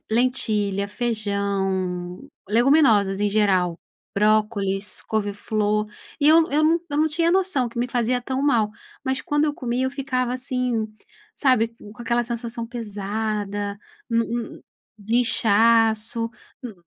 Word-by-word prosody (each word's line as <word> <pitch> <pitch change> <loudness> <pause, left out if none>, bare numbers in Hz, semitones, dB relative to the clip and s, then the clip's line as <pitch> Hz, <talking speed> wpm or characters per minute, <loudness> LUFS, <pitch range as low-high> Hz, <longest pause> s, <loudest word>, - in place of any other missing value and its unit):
lentilha, 210 -5 0
feijão, 200 -5 -2 0.2
leguminosas 220 -5 +4
em 205 - +2
geral, 190 -5 +2 0.4
brócolis, 210 -1 0
couveflor 210 0 -1 0.3
e 290 - +2
eu 325 +1 +5
eu 300 +2 +2
não 330 +2 +3
eu 290 - -3
não 310 +1 +3
tinha 330 +2 +1
noção 360 -9 +1
que 235 - -8
me 245 - +1
fazia 245 0 0
tão 260 +2 -2
mal, 235 -7 +2 0.3
mas 265 -1 -1
quando 295 +2 +1
eu 295 - +1
comia 250 -2 -2
eu 260 - 0
ficava 260 -3 -2
assim, 250 -3 -1 0.5
sabe, 255 -5 +3 0.2
com 220 - -15
aquela 240 0 0
sensação 235 0 -4
pesada, 205 -2 -3 0.3
no 230 -1 +2
n 235 -1 -5 0.4
de 215 +3 -1
inchaço, 225 0 +3 0.3
hum. 240 - -5
230 Hz, 130 wpm, -23 LUFS, 205-255 Hz, 0.5 s, eu